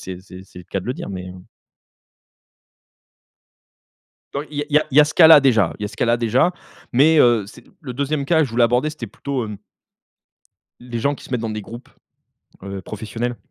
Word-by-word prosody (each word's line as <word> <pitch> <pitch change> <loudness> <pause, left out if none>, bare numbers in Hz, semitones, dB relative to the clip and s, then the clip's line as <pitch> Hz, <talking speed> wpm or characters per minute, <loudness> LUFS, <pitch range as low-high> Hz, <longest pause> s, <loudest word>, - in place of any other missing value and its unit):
si - - -11
c'est 90 -1 -7
c'est 95 -1 -12
c'est - - -11
le 90 - -15
cas 95 - -2
de - - -11
le 125 - -1
dire, - - -7
mais 90 -2 -6
heu 90 0 -12 2.9
Dans 140 - -3
il 150 -1 -9
y 145 - +1
a - - -5
il - - -4
y 150 - +8
a 155 - -2
il 130 - -3
y - - +10
a 150 - +7
ce 150 - -5
cas-là, 160 -3 +8
déjà 115 -10 +3
il - - -9
y - - -1
a - - -3
ce 105 - -14
cas-là, 120 0 +2
déjà, 120 +9 +2 0.4
mais 150 +5 +5
heu, 120 -5 +4
c'est 115 +4 -15 0.2
le 130 -5 -7
2e 140 +2 -2
cas 160 +2 +3
je 135 - -7
voulais 120 +1 +3
aborder 125 +6 +1
c'était 140 -7 -7
plutôt, 130 +4 -4
hem 105 -2 -8 1.2
les 120 -1 -5
gens 140 +5 0
qui - - -14
se - - -13
mettent 125 -3 -2
dans 115 - -3
des 110 0 -4
groupes, 120 +5 -11 0.7
heu, 100 0 -6
professionnels. 115 +5 -5
120 Hz, 230 wpm, -20 LUFS, 105-140 Hz, 2.9 s, y